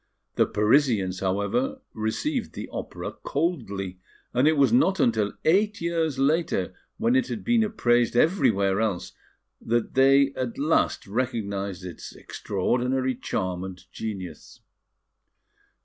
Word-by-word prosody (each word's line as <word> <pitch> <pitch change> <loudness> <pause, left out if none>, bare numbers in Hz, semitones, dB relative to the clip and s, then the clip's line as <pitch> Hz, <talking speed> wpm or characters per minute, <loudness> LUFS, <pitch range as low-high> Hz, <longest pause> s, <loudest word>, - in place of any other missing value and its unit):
The - - +2
Parisians, 105 -5 +2
however, 105 - -1
received 225 - -2
the - - -6
opera - - -5
coldly; 100 - -2 0.3
and 125 +4 +3
it 155 -1 +3
was 140 +9 +4
not 240 -7 +3
until 110 -3 +2
eight 205 +6 +3
years 165 -4 -1
later, 135 - +1 0.2
when 230 +2 +2
it 260 -1 +2
had 215 - -5
been 235 -2 +3
appraised 120 - +1
everywhere 105 - +3
else 95 -5 -2 0.5
that 120 0 0
they 135 +1 +5
at 125 -3 -4
last 150 +4 +1
recognised 100 -5 -3
its 90 - -8
extraordinary 130 +1 -1
charm 95 -7 -3
and 95 -1 -7
genius. 95 -7 -7
125 Hz, 120 wpm, -25 LUFS, 100-165 Hz, 0.5 s, they